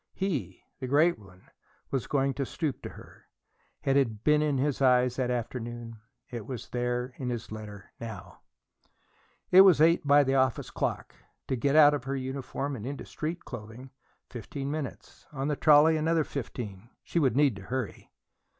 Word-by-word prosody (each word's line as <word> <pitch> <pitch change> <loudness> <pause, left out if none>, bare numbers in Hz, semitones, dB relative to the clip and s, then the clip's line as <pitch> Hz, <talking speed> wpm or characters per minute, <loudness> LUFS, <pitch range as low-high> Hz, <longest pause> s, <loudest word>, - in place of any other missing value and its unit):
He, 190 -7 -3 0.2
the 130 - -4
great 150 +3 +3
one, 95 -3 -17 0.5
was 135 -3 -1
going 135 -1 +1
to 140 - -2
stoop 145 0 -3
to - - -6
her. - - -15 0.6
It 135 - +2
had 115 -6 +1
been 150 0 +4
in 150 -2 +1
his 140 +1 -1
eyes 125 -1 +4
that 130 -2 0
afternoon; 120 -1 -4 0.3
it 120 -4 -6
was 125 -3 -6
there, 125 +1 -2
in 130 -2 -3
his 120 -3 -5
letter, 105 -3 -9
now. 110 -4 -9 1.1
It 185 - +10
was 190 -5 +7
eight 165 +2 +4
by 145 0 +5
the 135 0 0
office 130 -2 +1
clock. - - -3 0.4
To 130 - +1
get 140 +4 +1
out 150 -1 +8
of 140 -4 -3
her 135 +1 -2
uniform 135 +1 -4
and 110 - -7
into 140 +3 -5
street 165 +3 -5
clothing, 125 +2 -9 0.4
fifteen 135 +3 -6
minutes; 150 -4 -7
on 140 0 -3
the 150 - 0
trolley, 155 +2 +6
another 160 +1 +2
fifteen. 115 -7 -6
She 170 - -1
would 130 -6 +2
need 140 -5 +3
to - - -9
hurry. 125 +3 -5
130 Hz, 175 wpm, -28 LUFS, 120-145 Hz, 1.1 s, It